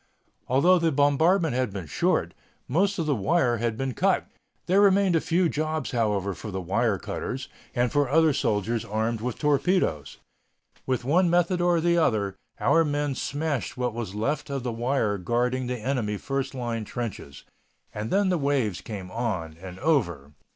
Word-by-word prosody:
Although 170 +9 +4
the 165 -1 +2
bombardment 155 +4 +3
had 125 -3 0
been 95 -3 -6
short, 75 - 0 0.3
most 195 +8 +1
of 165 - -1
the 150 - +2
wire 125 - +1
had 115 -1 -2
been 135 0 -2
cut. - - +1 0.4
There 190 +3 +4
remained 195 -2 +4
a 160 - +3
few 175 +1 +2
jobs, 155 0 -2
however, 105 -5 0
for 95 +5 -8
the 95 -1 -4
wire 100 +4 0
cutters, 125 +7 -5 0.3
and 120 -1 +1
for 145 -3 +1
other 160 0 +4
soldiers 110 0 0
armed 110 +1 -2
with 125 0 -3
torpedoes. 145 - +1 0.7
With 130 -2 -1
one 175 +6 +3
method 175 +1 +2
or 175 -1 +3
the 170 +1 +2
other 105 - +1 0.2
our 165 - +4
men 145 -2 -1
smashed 145 -1 -3
what 125 -2 -1
was 110 -4 -5
left 140 +8 -2
of 135 -2 -3
the 125 - -2
wire 115 -4 0
guarding 125 +5 0
the 125 0 -2
enemy 110 -3 -2
first 135 +3 -3
line 120 -3 -3
trenches. 105 - -6 0.5
And 105 +1 -4
then 200 0 +2
the 180 -2 +1
waves 135 -9 0
came 95 -4 -7
on 95 -9 -3
and 90 -1 -8
over. 95 - 0
125 Hz, 170 wpm, -26 LUFS, 110-155 Hz, 0.7 s, Although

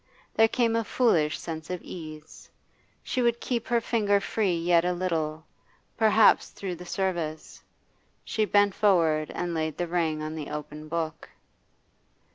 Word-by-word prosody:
There 225 - +5
came 230 -1 +1
a 230 - +1
foolish 175 -11 +2
sense 160 -1 -7
of 180 -1 -3
ease. 155 -2 -10 0.5
She 255 - -1
would 235 -1 +2
keep 240 -2 -2
her 240 -1 +2
finger 210 -3 +1
free 195 -3 0
yet 170 0 +3
a 180 0 +1
little, 160 -3 -2 0.5
perhaps 220 0 +5
through 185 -3 -6
the 180 +1 -10
service. 170 -5 -3 0.6
She 215 - 0
bent 205 -1 +3
forward 165 -7 +2
and 175 -1 -2
laid 160 -1 -2
the 175 - -1
ring 165 -3 -1
on 155 0 -4
the 155 -2 -6
open 150 +1 -7
book. 160 -1 -4
175 Hz, 150 wpm, -27 LUFS, 155-210 Hz, 0.6 s, There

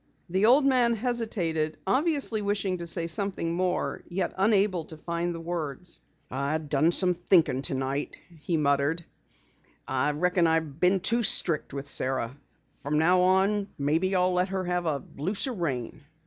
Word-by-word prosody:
The 190 +4 +3
old 270 +4 +5
man 245 -3 +3
hesitated, 205 -10 -2
obviously 270 - 0
wishing 200 -3 -1
to 170 - -6
say 165 0 +3
something 170 0 -1
more, 180 +1 -1
yet 180 0 -2
unable 195 -3 +2
to 160 - -9
find 170 +2 -3
the - - -6
words. 170 0 -4 0.3
"I 140 +4 -1
done 155 +1 +1
some 180 0 +4
thinkin' 170 -6 +2
tonight," 135 +1 -2 0.2
he 165 +2 -1
muttered. 145 +3 0 0.8
"I 130 +2 0
reckon 180 +2 +1
I 160 0 +3
been 170 +5 0
too 235 +5 +2
strict 170 -7 +3
with 140 0 -6
Sara. 130 -2 -2 0.4
From 150 +2 -2
now 180 +4 +4
on 195 +2 +2
maybe 160 +7 0
I'll 180 0 +2
let 180 +1 +1
her 190 -1 -2
have 180 -1 -2
a 145 -3 -1 0.2
looser 200 - -1
rein." 145 - -4
175 Hz, 155 wpm, -27 LUFS, 155-195 Hz, 0.8 s, old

